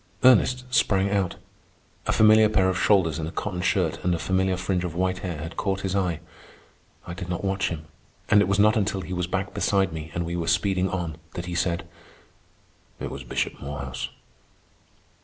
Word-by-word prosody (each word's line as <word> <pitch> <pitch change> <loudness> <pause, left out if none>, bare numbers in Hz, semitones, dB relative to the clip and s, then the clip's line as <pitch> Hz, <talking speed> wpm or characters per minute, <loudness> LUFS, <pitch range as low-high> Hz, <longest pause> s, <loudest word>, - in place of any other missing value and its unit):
Ernest 125 0 +5
sprang 100 -4 +3
out. 100 -3 0 0.7
A - - +3
familiar 110 0 +6
pair 95 -3 +3
of 95 - -1
shoulders 85 -7 +3
in 80 - -3
a - - -5
cotton 90 -2 -3
shirt - - 0
and 90 -1 +2
a - - -2
familiar 95 +1 0
fringe 90 -1 -1
of 85 -2 -4
white 95 +1 0
hair 90 -5 -4
had 80 +3 -7
caught 95 -1 -1
his 95 0 -2
eye. 90 -5 0 0.8
I 85 - -6
did 90 0 -7
not 90 +1 -3
watch 95 0 0
him, 80 -2 -6 0.4
and 105 - +6
it 100 - +2
was 100 0 +1
not 105 +1 +5
until 100 -2 0
he 90 0 -6
was 90 -1 -1
back 95 +2 -2
beside 95 -4 +1
me 80 0 -6
and 85 0 -1
we 85 +1 -3
were 85 -1 -2
speeding 95 +1 +2
on 85 -5 -3 0.2
that 85 - -4
he 90 - -5
said: 85 0 -1 1.1
"It - - -4
was 70 - -7
Bishop - - -3
Morehouse." 65 -2 -5
90 Hz, 195 wpm, -25 LUFS, 85-100 Hz, 1.1 s, familiar